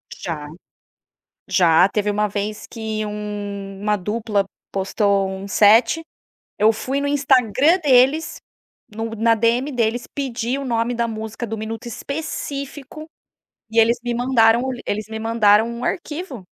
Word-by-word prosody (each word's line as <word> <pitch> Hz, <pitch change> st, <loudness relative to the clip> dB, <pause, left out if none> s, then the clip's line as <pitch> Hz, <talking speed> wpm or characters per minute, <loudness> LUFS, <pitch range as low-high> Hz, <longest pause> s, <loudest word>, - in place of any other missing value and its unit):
Já. 150 Hz, -4 st, -5 dB, 1.0 s
Já 180 Hz, -1 st, +5 dB
teve 210 Hz, 0 st, -1 dB
uma 210 Hz, +1 st, +1 dB
vez 210 Hz, +1 st, -4 dB
que 220 Hz, -1 st, -4 dB
um 205 Hz, -2 st, -6 dB
uma 210 Hz, 0 st, +1 dB
dupla 210 Hz, 0 st, -1 dB, 0.3 s
postou 195 Hz, 0 st, +1 dB
um 190 Hz, +1 st, -6 dB
set. 225 Hz, +8 st, +4 dB, 0.6 s
Eu 215 Hz, +2 st, +5 dB
fui 265 Hz, +5 st, -3 dB
no 285 Hz, -, -1 dB
Instagram 285 Hz, -, +3 dB
deles, 280 Hz, 0 st, +3 dB, 0.5 s
no 225 Hz, +1 st, -4 dB
na 230 Hz, +1 st, +3 dB
DM 235 Hz, +5 st, +1 dB
deles 235 Hz, 0 st, -1 dB
pedir 255 Hz, -1 st, -2 dB
o 275 Hz, -, -5 dB
nome 235 Hz, -1 st, 0 dB
da 235 Hz, 0 st, 0 dB
música 220 Hz, +1 st, -5 dB
do 225 Hz, -, -4 dB
minuto 220 Hz, +2 st, -6 dB
específico 280 Hz, +2 st, -6 dB, 0.7 s
e 230 Hz, -, +3 dB
eles 230 Hz, +2 st, +4 dB
me 240 Hz, -1 st, -2 dB
mandaram 235 Hz, -1 st, +3 dB
o 265 Hz, -, -2 dB
lin 245 Hz, -, -7 dB
eles 215 Hz, +1 st, -3 dB
me 220 Hz, -, -5 dB
mandaram 220 Hz, -1 st, +3 dB
um 235 Hz, +1 st, -6 dB
arquivo 305 Hz, -, -4 dB
225 Hz, 145 wpm, -21 LUFS, 210-255 Hz, 1.0 s, Já